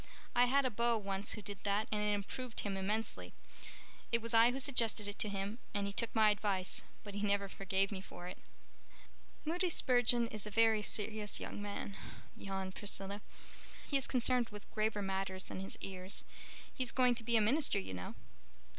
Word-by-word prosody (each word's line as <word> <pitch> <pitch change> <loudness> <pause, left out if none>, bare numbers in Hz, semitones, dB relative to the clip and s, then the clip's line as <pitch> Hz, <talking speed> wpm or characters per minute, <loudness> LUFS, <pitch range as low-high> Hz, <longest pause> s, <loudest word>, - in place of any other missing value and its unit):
I 245 +1 +6
had 275 +2 +3
a 255 - +1
beau 235 +1 +2
once 200 -1 -1
who 215 - -5
did 200 -1 -6
that 205 +1 +1
and 210 -1 +1
it 210 0 +2
improved 230 +4 -5
him 200 -2 -2
immensely. 210 +4 -2 0.8
It 235 - +4
was 230 +1 -2
I 230 +1 +7
who 250 - -2
suggested 235 -6 +2
it 205 - -6
to 210 - +1
him 200 +3 -3 0.2
and 200 -1 +1
he 200 - -3
took 230 +2 -1
my 215 -1 +6
advice, 195 -3 +1 0.2
but 205 - -8
he 205 - -3
never 200 -1 +1
forgave 195 0 0
me 190 -2 -4
for 180 -2 -9
it." 180 - -7 1.1
"Moody 350 +4 +1
Spurgeon 245 -5 +4
is 215 -2 -5
a - - -3
very 220 0 +4
serious 210 0 -1
young - - -5
man," 205 -1 -5 0.4
yawned 190 -1 -4
Priscilla. 200 0 -4 0.7
"He 285 - -2
is 270 - +3
concerned 250 -1 +2
with 210 -1 -11
graver 215 -1 0
matters 190 -1 -1
than - - -7
his 195 - -5
ears. 190 0 0 0.5
He - - -5
is 250 - +1
going 250 -1 +4
to 235 -1 -5
be 235 0 +3
a - - +4
minister, 275 +8 +3
you 95 -1 -3
know." 90 -1 -6
210 Hz, 195 wpm, -36 LUFS, 195-235 Hz, 1.1 s, I